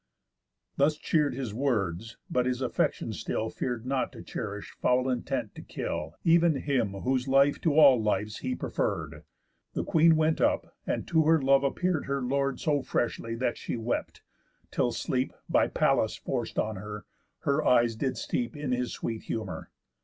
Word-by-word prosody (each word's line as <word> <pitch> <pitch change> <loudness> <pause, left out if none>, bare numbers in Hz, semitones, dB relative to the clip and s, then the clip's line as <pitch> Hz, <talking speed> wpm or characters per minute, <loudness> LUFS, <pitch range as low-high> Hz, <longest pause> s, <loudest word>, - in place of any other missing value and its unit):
_ - - -45
Thus 150 +2 +3
cheer'd 150 -5 +1
his 125 -5 -4
words, 110 -4 -1
but 125 0 +1
his 125 -1 0
affections - - -1
still 110 - -2
Fear'd 120 -2 -3
not 130 0 -1
to - - -10
cherish 105 -3 -5
foul 125 +1 +3
intent 125 -3 -2
to - - -9
kill 80 +1 -4
Ev'n 170 -1 +5
him 130 -8 0
whose 125 +6 -1
life 135 +1 +4
to 155 -4 +2
all 135 -6 +7
lives 105 0 -1
he 255 - -2
preferr'd. - - -3 0.5
The - - -1
queen 165 -1 +5
went 155 0 +2
up, - - +1
and - - -2
to 160 -2 +3
her 160 +1 +5
love 135 0 +4
appear'd 175 +3 0
Her 140 -1 -1
lord 135 0 0
so 145 -3 +1
freshly, 115 -2 -2
that 120 0 -1
she - - -3
wept, 115 +1 -3 0.5
till 120 - +1
sleep 130 +2 -1
(By - - +3
Pallas - - +2
forc'd - - -3
on 110 -2 0
her) 105 +1 -7 0.4
her 140 +2 +1
eyes 120 -2 +4
did 130 +3 -2
steep 120 +2 -2
In 145 -3 -3
his 125 -1 -1
sweet 115 -1 -4
humour. 100 -7 -4
130 Hz, 170 wpm, -28 LUFS, 115-140 Hz, 0.5 s, all